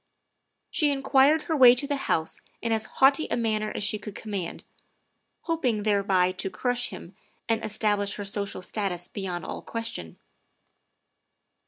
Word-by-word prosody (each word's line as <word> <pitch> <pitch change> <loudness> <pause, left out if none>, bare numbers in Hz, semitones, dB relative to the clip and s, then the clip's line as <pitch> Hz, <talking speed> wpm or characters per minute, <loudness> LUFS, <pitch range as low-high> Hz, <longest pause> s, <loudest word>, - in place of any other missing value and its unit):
She 300 - +2
inquired 280 +2 +4
her 320 - -1
way 250 -4 +8
to 250 - -2
the 285 0 -1
House 160 - -1 0.2
in 230 - -2
as 220 -1 +1
haughty 275 +3 +4
a - - 0
manner 215 -2 0
as - - -1
she 210 +1 0
could 210 -2 -8
command, 200 -6 -5 0.8
hoping 260 -11 0
thereby 195 -3 +2
to 185 +1 -4
crush 245 +3 -1
him 185 - -10 0.3
and 225 -1 0
establish 205 -1 0
her 205 - -5
social 200 -1 -3
status 180 -4 -2
beyond 180 -4 -5
all - - -5
question. 230 - -4
215 Hz, 150 wpm, -27 LUFS, 200-250 Hz, 0.8 s, way